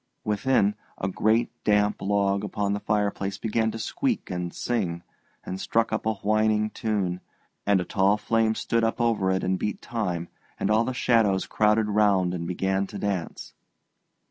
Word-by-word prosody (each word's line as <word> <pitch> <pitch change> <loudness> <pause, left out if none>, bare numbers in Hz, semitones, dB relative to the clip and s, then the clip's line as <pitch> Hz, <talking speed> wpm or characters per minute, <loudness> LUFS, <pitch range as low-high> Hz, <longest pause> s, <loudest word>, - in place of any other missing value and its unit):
Within, 105 0 +2 0.2
a 95 - -2
great 110 +4 +1
damp 105 0 +2
log 100 0 +1
upon 100 -1 -1
the 100 - -1
fireplace 100 -2 -1
began 110 0 0
to 110 - -5
squeak 245 - -2
and 90 -1 -3
sing, 90 -8 -2 0.4
and 95 +1 -5
struck 115 0 +1
up 110 - -1
a 110 - +1
whining 110 +1 +1
tune, 95 -5 -2 0.5
and 100 -2 +4
a 90 - -2
tall 100 +1 +2
flame 110 +1 +1
stood 115 +1 0
up 115 - 0
over 115 -5 +2
it 95 0 0
and 95 0 0
beat 105 - -2
time, 90 -8 -3 0.3
and - - 0
all 110 +2 +3
the 130 0 -3
shadows 110 -7 +2
crowded 105 0 +2
round 100 -4 +2
and 85 -2 -4
began 95 +2 0
to - - -8
dance. 100 -5 -3
105 Hz, 170 wpm, -26 LUFS, 95-110 Hz, 0.5 s, and